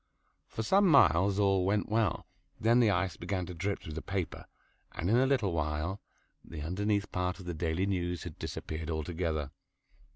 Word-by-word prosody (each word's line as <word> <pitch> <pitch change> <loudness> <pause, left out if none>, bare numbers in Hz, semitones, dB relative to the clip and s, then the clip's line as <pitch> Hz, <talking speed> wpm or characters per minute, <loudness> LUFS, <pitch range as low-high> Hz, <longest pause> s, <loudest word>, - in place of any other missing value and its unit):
For 110 - -4
some 195 - +4
miles 95 - +5
all 100 -2 +3
went 100 +2 +1
well. 110 -1 0 0.3
Then 115 +2 +4
the 115 -3 +5
ice 95 -2 0
began 90 +1 -3
to 90 - -7
drip 95 +4 -2
through 80 - -8
the 80 - -4
paper, 95 -3 -4 0.5
and 90 +5 -1
in - - +5
a 130 +2 +4
little 120 -10 +1
while, 75 +4 -2 0.4
the 75 -3 -7
underneath 100 +4 -1
part 90 0 -1
of 90 - -10
"The 90 - -3
Daily 80 +3 -1
News" 90 -3 -2
had - - -8
disappeared 80 0 -5
altogether. 80 -2 -2
90 Hz, 175 wpm, -31 LUFS, 80-105 Hz, 0.5 s, miles